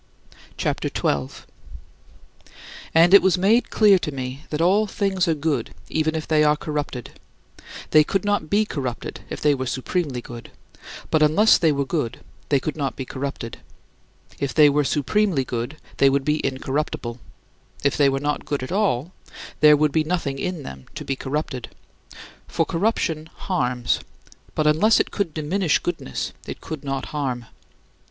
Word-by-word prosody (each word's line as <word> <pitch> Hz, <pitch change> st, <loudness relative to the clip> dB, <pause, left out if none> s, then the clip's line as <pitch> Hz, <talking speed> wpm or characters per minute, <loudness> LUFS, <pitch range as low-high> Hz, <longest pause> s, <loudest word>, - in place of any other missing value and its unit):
CHAPTER -, -, -1 dB
XII -, -, -5 dB
18. 70 Hz, -2 st, +1 dB, 1.7 s
And 170 Hz, +3 st, +6 dB
it 200 Hz, -, +10 dB
was 190 Hz, -1 st, +3 dB
made 210 Hz, +7 st, +3 dB
clear 205 Hz, -3 st, +5 dB
to 150 Hz, -, -3 dB
me 130 Hz, +1 st, -6 dB
that 150 Hz, -, -3 dB
all 195 Hz, +6 st, +3 dB
things 190 Hz, -2 st, 0 dB
are 165 Hz, -, +2 dB
good 150 Hz, 0 st, -2 dB
even 155 Hz, 0 st, 0 dB
if 155 Hz, -, -3 dB
they 155 Hz, -1 st, +3 dB
are 150 Hz, 0 st, +4 dB
corrupted. 150 Hz, -6 st, -4 dB, 0.8 s
They 155 Hz, -1 st, +7 dB
could 195 Hz, +5 st, -1 dB
not 205 Hz, -7 st, 0 dB
be 210 Hz, +2 st, +3 dB
corrupted 130 Hz, -, -4 dB
if -, -, -6 dB
they 150 Hz, -1 st, +4 dB
were 130 Hz, -2 st, -3 dB
supremely 130 Hz, +1 st, -2 dB
good; 120 Hz, -1 st, -10 dB, 0.6 s
but 155 Hz, -, +3 dB
unless 180 Hz, +9 st, +5 dB
they 165 Hz, -3 st, +4 dB
were 140 Hz, -1 st, 0 dB
good 135 Hz, -6 st, -2 dB, 0.3 s
they 140 Hz, -, +4 dB
could 150 Hz, +3 st, -4 dB
not 140 Hz, -3 st, -2 dB
be 130 Hz, -, -5 dB
corrupted. 130 Hz, -3 st, -5 dB, 0.8 s
If 140 Hz, -3 st, -2 dB
they 150 Hz, -2 st, +7 dB
were 150 Hz, +1 st, +2 dB
supremely 155 Hz, -, +1 dB
good, 120 Hz, +5 st, -4 dB, 0.2 s
they 140 Hz, -, +5 dB
would 135 Hz, 0 st, 0 dB
be 150 Hz, 0 st, +1 dB
incorruptible; 130 Hz, -2 st, -2 dB, 0.6 s
if 140 Hz, 0 st, +2 dB
they 145 Hz, -2 st, +4 dB
were 135 Hz, 0 st, -1 dB
not 145 Hz, +1 st, -2 dB
good 145 Hz, -3 st, -3 dB
at 130 Hz, -, -6 dB
all, 185 Hz, -, 0 dB, 0.5 s
there 150 Hz, 0 st, +7 dB
would 150 Hz, 0 st, +2 dB
be 155 Hz, +2 st, +2 dB
nothing 155 Hz, -5 st, -2 dB
in 180 Hz, -3 st, -3 dB
them 65 Hz, -, -9 dB
to -, -, -6 dB
be 135 Hz, -, -1 dB
corrupted. 135 Hz, -2 st, -4 dB, 0.8 s
For -, -, 0 dB
corruption 165 Hz, -4 st, -1 dB
harms; 125 Hz, -10 st, -1 dB, 0.6 s
but 155 Hz, -, +1 dB
unless 160 Hz, +9 st, +4 dB
it -, -, 0 dB
could 200 Hz, -6 st, -1 dB
diminish 160 Hz, +3 st, +1 dB
goodness, 165 Hz, -, -4 dB
it -, -, -6 dB
could 155 Hz, -3 st, -7 dB
not 135 Hz, -1 st, -3 dB
harm. 130 Hz, -5 st, -2 dB
150 Hz, 165 wpm, -23 LUFS, 135-170 Hz, 1.7 s, it